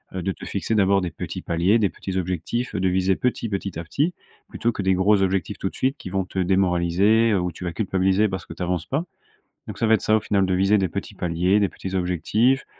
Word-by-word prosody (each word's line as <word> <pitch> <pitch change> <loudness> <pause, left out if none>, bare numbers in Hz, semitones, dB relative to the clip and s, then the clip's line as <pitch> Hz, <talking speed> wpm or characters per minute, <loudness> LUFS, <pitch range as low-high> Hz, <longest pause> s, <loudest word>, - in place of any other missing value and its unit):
heu, 95 - -2
de 95 - -1
te - - -9
fixer 100 +3 -2
d'abord 100 -1 +3
des 90 -2 -3
petits - - -6
paliers, 90 +7 +2
des 100 -3 +2
petits 95 +1 -5
objectifs, 95 +7 -2
de 95 -1 +1
viser 95 +1 +2
petit, 120 -2 -1
petit 100 -3 -4
à - - -4
petit, 145 - -1 0.4
plutôt 115 +2 -1
que 105 - -4
des 95 0 +3
gros 95 +2 +3
objectifs, 95 +1 0
tout - - -2
de - - -16
suite, 130 +2 0
qui - - -8
vont 95 +1 0
te 95 - -5
démoraliser, 95 +4 +3
heu, 100 - +2
ou 90 0 -2
tu 85 - -10
vas 85 - -3
culpabiliser 95 +1 +1
parce 95 0 -5
que - - -9
tu - - -5
avances 90 -1 -1
pas. 145 +5 -1 0.7
Donc, - - -7
ça 115 - +1
va 110 - +5
être 110 - 0
ça, 110 - +3
au - - +1
final, 100 -1 +1
de 95 - 0
viser 95 +3 +3
des 95 -2 +1
petits - - -6
paliers, 90 +4 +1
des 100 - +2
petits 95 +1 -7
objectifs, 95 - +1
95 Hz, 255 wpm, -23 LUFS, 90-105 Hz, 0.7 s, va